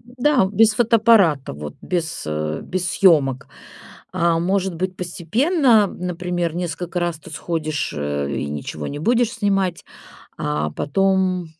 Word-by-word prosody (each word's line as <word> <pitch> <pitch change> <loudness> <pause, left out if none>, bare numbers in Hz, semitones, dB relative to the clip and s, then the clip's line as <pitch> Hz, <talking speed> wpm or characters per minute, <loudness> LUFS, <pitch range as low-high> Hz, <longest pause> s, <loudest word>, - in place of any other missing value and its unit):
Да, 250 +1 +1
без 220 +2 +5
фотоаппарата, 220 - +3
вот, 75 +1 -7
без, 170 -3 -3
э, 75 0 -3
без, 180 -1 -3
съемок. 140 -9 +3 0.6
А 170 -1 +2
может 190 +1 0
быть, 185 +2 -3
постепенно, 220 - +2
например, 180 -2 -3
несколько 175 0 -3
раз 175 -2 -2
ты 160 - -13
сходишь, 155 -2 -3
э, 70 -1 -2
и - - -2
ничего 75 +1 -5
не 145 - -5
будешь 235 +7 +1
снимать. 195 -6 -1 0.5
А 75 +1 -1
потом, 185 - 0
175 Hz, 130 wpm, -21 LUFS, 150-200 Hz, 0.6 s, без